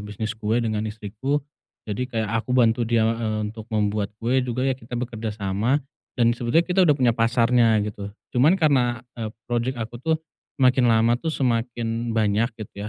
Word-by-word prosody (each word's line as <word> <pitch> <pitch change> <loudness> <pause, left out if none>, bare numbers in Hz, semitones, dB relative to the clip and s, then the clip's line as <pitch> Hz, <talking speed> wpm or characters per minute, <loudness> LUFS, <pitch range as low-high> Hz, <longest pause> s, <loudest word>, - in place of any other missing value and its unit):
bisnis 105 +1 -4
kue 110 0 -1
dengan 110 -2 -1
istriku, 110 +7 -3 0.4
jadi 105 +3 -3
kayak 110 -4 -2
aku 125 +2 -2
bantu 115 -1 +3
dia, 115 -1 +3
eee, 110 -2 -2
untuk 110 0 -10
membuat 105 -2 0
kue 120 +4 +1
juga 125 0 -2
ya 135 - +2
kita 125 -1 -7
bekerja 115 -3 -4
sama, 110 +8 0 0.3
dan 120 -2 +4
sebetulnya 120 +8 +1
kita 180 +2 +1
udah 145 - +5
punya 125 -3 +3
pasarnya 115 0 +3
gitu, 105 -1 -6 0.2
cuman 150 +10 +4
karena, 125 - +2 0.2
eee, 110 - -2 0.2
project 120 +2 -1
aku 115 +1 -6
tuh 160 +4 +1 0.4
semakin 130 -2 +4
lama 115 +1 +4
tuh 165 - -3
semakin 115 -4 -1
banyak 110 +2 +2
gitu 105 -1 -7
115 Hz, 170 wpm, -23 LUFS, 110-125 Hz, 0.4 s, udah